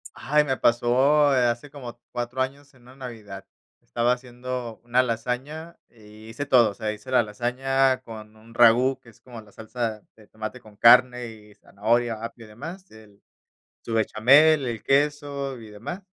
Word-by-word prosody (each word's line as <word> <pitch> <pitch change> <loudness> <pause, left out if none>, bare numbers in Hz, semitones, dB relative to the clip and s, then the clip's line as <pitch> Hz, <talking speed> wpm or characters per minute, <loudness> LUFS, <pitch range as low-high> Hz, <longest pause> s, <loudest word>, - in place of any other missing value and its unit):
¡Ay!, 150 +4 +2
me 135 -3 -2
pasó, 135 +5 +3
eh, 125 -1 +3
hace 120 +5 -3
como 125 -4 -10
4 120 +1 -4
años 140 +2 -5
en 130 -2 -23
una 125 +2 -16
Navidad. 110 -7 -9 0.4
Estaba 120 - 0
haciendo 125 -1 -7
una 120 +2 +2
lasaña, 130 +8 -4
y 110 -1 -16
hice 130 +6 -5
todo, 120 -6 +4
o - - -11
sea, 110 +1 -3
hice 110 +5 -10
la 125 -2 +4
lasaña 130 +4 0
con 110 -3 -11
un 110 +1 -18
ragú, 120 +3 +4
que 125 - -18
es 110 - -21
como 120 -3 -11
la 105 -1 -19
salsa 110 0 -5
de 110 -2 -19
tomate 110 +3 -7
con 110 -3 -17
carne 125 +1 +5
y 105 -2 -14
zanahoria, 115 +2 -1
apio 115 0 -8
y - - -15
demás, 165 - -10
el 105 -2 -18 0.6
su 115 - -4
bechamel, 135 +7 +4
el 115 -3 -4
queso 140 -1 -1
y 110 -2 -12
demás. 115 - -8
120 Hz, 175 wpm, -24 LUFS, 110-135 Hz, 0.6 s, carne